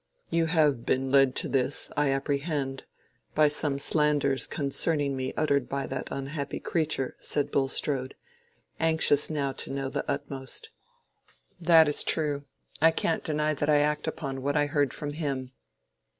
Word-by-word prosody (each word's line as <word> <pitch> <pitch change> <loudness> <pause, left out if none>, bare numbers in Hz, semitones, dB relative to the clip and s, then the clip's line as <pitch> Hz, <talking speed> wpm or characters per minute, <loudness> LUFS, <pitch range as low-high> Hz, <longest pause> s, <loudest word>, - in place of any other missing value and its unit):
"You 165 -1 +2
have 150 -7 +2
been 130 0 0
led 135 -2 +4
to - - 0
this, 135 0 0
I 145 -1 +2
apprehend, 140 0 -2 0.5
by 150 -1 +5
some 145 -1 0
slanders 145 -2 +2
concerning 145 0 0
me 130 0 -2
uttered 140 -4 +1
by 140 0 -2
that 130 -1 -4
unhappy 140 +1 -4
creature," 155 -5 -1
said 145 - -2
Bulstrode, 135 -1 0 0.6
anxious 160 -3 +3
now 145 -3 -1
to - - -6
know 135 -1 -3
the - - -3
utmost. 140 - -4 0.9
"That 165 -2 +6
is 150 - +4
true. 145 -3 0 0.4
I 165 - +7
can't 165 0 0
deny 150 0 0
that 145 0 -2
I 150 - +5
act 150 +2 +1
upon 135 -4 -4
what 145 +2 0
I 145 - +3
heard 145 -3 +1
from 145 -1 -5
him." 135 -5 -3
145 Hz, 150 wpm, -28 LUFS, 135-155 Hz, 0.9 s, I